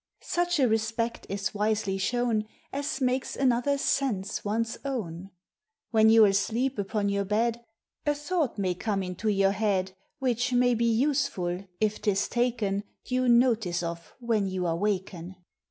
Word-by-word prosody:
Such 350 -1 0
a 260 - +5
respect 225 +1 -1
is 200 +1 -2
wisely 210 -2 0
shown, 230 0 0 0.3
As 285 +3 -2
makes 255 0 0
another's 270 +2 +1
sense 210 -8 0
one's 225 +2 -1
own. 195 -10 -4 0.6
When 220 -1 +5
you're 225 -1 +8
asleep 225 +6 +1
upon 200 +1 -1
your 200 0 0
bed, 230 +4 0 0.4
A 295 - +3
thought 295 -3 -1
may 185 -3 0
come 195 +2 -2
into 180 +4 -3
your 195 -1 +3
head, 200 -2 0 0.3
Which 250 -1 0
may 245 0 +4
be 235 0 +2
useful, 225 -8 0
if 215 -1 0
'tis 195 -2 +1
taken 230 -5 0 0.2
Due 255 0 +1
notice 230 -8 +3
of 170 0 -6
when 225 -5 0
you 185 -1 -2
are 165 -1 +1
waken. 185 -2 -2
220 Hz, 150 wpm, -27 LUFS, 195-245 Hz, 0.6 s, you're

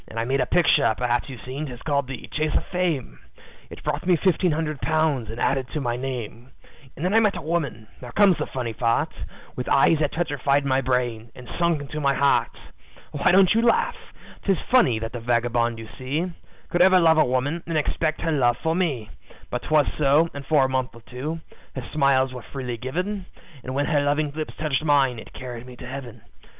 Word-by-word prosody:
"I 115 0 -1
made 135 +2 +1
a 125 - 0
picture 145 -8 +3
perhaps 120 +2 0
you've 130 -3 -9
seen, 135 +4 -4
'tis 125 -2 -9
called 140 -3 0
the 135 -2 -7
`Chase 155 0 +1
of - - -2
Fame.' 165 - -2 0.5
It - - -11
brought 150 0 -2
me 180 0 +4
fifteen 180 +1 +2
hundred 155 -2 -2
pounds 155 -7 +1
and 115 +2 -6
added 135 -2 +1
to 155 - -1
my 120 -4 -1
name, 125 -2 -5 0.5
And 160 - -4
then 185 - +1
I 225 - +6
met 210 -3 +2
a - - -5
woman 150 -9 -2
now 125 - -8
comes 195 +5 +4
the - - -2
funny 120 -3 -4
part 115 0 0 0.4
With 125 - -4
eyes 150 +3 +4
that 150 -2 +1
petrified 145 -4 0
my 135 0 +2
brain, 120 -3 -1
and 125 -1 -11
sunk 170 -3 +2
into 150 +2 -6
my 140 -1 +2
heart. 140 0 +3 0.6
"Why 145 +4 +2
don't 190 0 +6
you 225 - +3
laugh? 235 0 +2 0.5
'Tis 195 -3 +2
funny 240 - +5
that 115 +1 -4
the 120 - -5
vagabond 120 0 +1
you 115 0 -8
see 150 +8 -2 0.4
Could 175 - +1
ever 185 0 +7
love 160 -2 +5
a - - +7
woman, 130 +7 -1
and 165 -2 -1
expect 155 +1 -1
her 165 - 0
love 120 -5 +2
for 160 +4 -1
me; 145 - -1 0.4
But 125 - -2
'twas 155 -2 +4
so, 150 +3 +4
and 140 - -7
for 150 -4 +4
a - - +1
month 130 -2 -2
or 115 - -13
two, 150 +8 -5 0.3
her 130 -3 -5
smiles 135 -3 +3
were 125 - -7
freely 125 -2 -5
given, 180 - -3 0.4
And 130 - -5
when 145 +1 +1
her 145 -2 +2
loving 145 +1 +1
lips 155 +1 -5
touched 155 -1 -1
mine, 140 -5 +3
it - - -12
carried 125 -1 -8
me 125 - -10
to 125 - -10
Heaven. 125 -2 -8
140 Hz, 210 wpm, -24 LUFS, 125-160 Hz, 0.6 s, ever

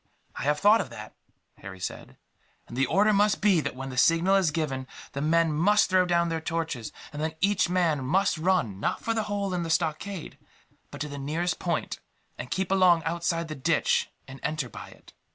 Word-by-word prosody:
"I - - -5
have 150 +1 +1
thought 210 +5 +5
of - - -7
that," - - -10 0.5
Harry 95 -1 -9
said, 90 - -7 0.5
"and - - -9
the 135 +1 +1
order 205 +8 +3
must 205 +1 +3
be 195 -6 +3
that, - - -4
when 135 +1 -6
the 130 - -8
signal 165 +6 +4
is 190 -4 +3
given, 145 -4 -3 0.2
the 140 - -4
men 165 +1 +2
must 195 +6 +3
throw 185 -1 +4
down 170 -1 +2
their 165 -1 -2
torches; 160 -9 -3 0.2
and 150 - -5
then 160 0 -2
each 200 -1 +2
man 170 -6 +1
must 175 +5 +1
run, 160 - +1
not - - -1
for 230 - 0
the 225 - 0
hole 200 -2 -2
in 180 - -1
the 165 - -4
stockade, 165 +2 -2 0.5
but - - -9
to 150 - -2
the 145 -1 -7
nearest 160 +6 -2
point, 170 -3 -2 0.4
and 125 - -7
keep 190 +4 -2
along 180 -4 +4
outside 170 +1 -1
the 155 - -5
ditch, 135 -4 +1 0.2
and 135 0 -10
enter 150 -3 -2
by - - -9
it. - - -18
165 Hz, 205 wpm, -27 LUFS, 150-185 Hz, 0.5 s, thought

